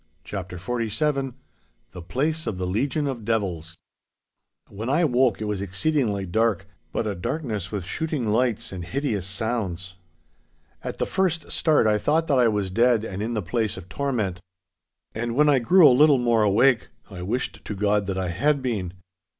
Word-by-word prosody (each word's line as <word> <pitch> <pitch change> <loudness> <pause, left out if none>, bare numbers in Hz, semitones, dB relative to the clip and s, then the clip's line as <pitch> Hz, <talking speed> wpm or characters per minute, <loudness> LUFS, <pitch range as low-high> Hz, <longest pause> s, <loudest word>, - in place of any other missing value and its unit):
*CHAPTER 95 -2 -6
XLVII* 125 - -1 0.6
*THE 90 - -9
PLACE 150 - -2
OF 100 - -2
THE 90 - -2
LEGION 130 +10 0
OF 130 -5 -3
DEVILS* 90 -8 -2 0.9
When 110 +5 -6
I 155 +6 +3
woke 125 -5 +2
it 110 - -3
was 105 -2 -2
exceedingly 100 - 0
dark, 105 +1 +1 0.3
but - - -1
a 105 - -1
darkness 105 - -3
with 100 -5 -4
shooting 150 - -2
lights 120 -1 0
and 90 -2 -6
hideous 110 -3 -2
sounds. 95 -4 -3 0.9
At - - -5
the - - 0
first 180 -4 -1
start 155 -7 +3
I 105 -1 +3
thought 160 +7 +1
that 140 -5 +2
I 120 - +5
was 105 -4 -1
dead 115 +2 +3
and 100 -3 -5
in 115 +2 -2
the 105 - -1
place 110 +3 -1
of 90 - -10
torment. 110 -11 -2 0.7
And 115 +1 -3
when 150 +2 +4
I 140 -2 +5
grew 170 +7 +6
a 130 - +6
little 145 +2 +6
more 120 -2 +2
awake, 110 +5 +3 0.2
I 90 -2 -7
wished 115 +8 -3
to 105 - -5
God 105 0 +1
that 95 -1 -2
I 95 -1 -1
had 140 - +1
been. 100 -8 -2
110 Hz, 175 wpm, -24 LUFS, 95-135 Hz, 0.9 s, grew